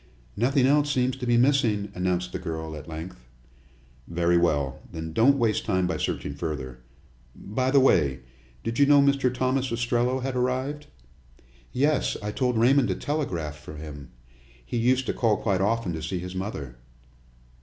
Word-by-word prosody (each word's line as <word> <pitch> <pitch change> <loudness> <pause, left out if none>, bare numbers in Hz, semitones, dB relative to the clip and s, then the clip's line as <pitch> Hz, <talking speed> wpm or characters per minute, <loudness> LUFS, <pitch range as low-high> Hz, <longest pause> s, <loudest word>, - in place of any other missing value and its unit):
"Nothing 130 +4 +2
else 145 +2 +3
seems 130 -2 +1
to 125 -2 -5
be 120 0 +4
missing," 120 -6 +2
announced 90 0 -1
the - - -4
girl, 80 -3 -5
at 75 0 -9
length. 80 -5 -8 0.8
"Very 85 +1 +1
well; 75 -6 +1
then 80 -1 -6
don't 135 +9 +4
waste 110 -3 +1
time 95 -3 +1
by 90 - -1
searching - - -3
further. 70 -4 -5 0.6
By 130 +6 -2
the 140 +1 +5
way, 70 - +3 0.4
did 115 +3 -3
you 140 - +6
know 145 0 +7
Mr. 140 -2 +3
Thomas 130 0 0
Ostrello 120 +2 0
had 135 -1 -2
arrived?" 130 +4 -1 0.8
"Yes; 145 +3 +1
I 105 - -2
told 125 0 0
Raymond 130 +3 +4
to - - -1
telegraph 85 - -3
for 75 +1 -10
him. 75 -4 -9 0.6
He 70 - -3
used 125 +3 +2
to - - -1
call 110 -3 +2
quite 95 -3 0
often 105 -2 0
to 80 - -5
see 85 +4 -3
his 90 +1 -6
mother." 95 - -5
115 Hz, 165 wpm, -26 LUFS, 85-130 Hz, 0.8 s, know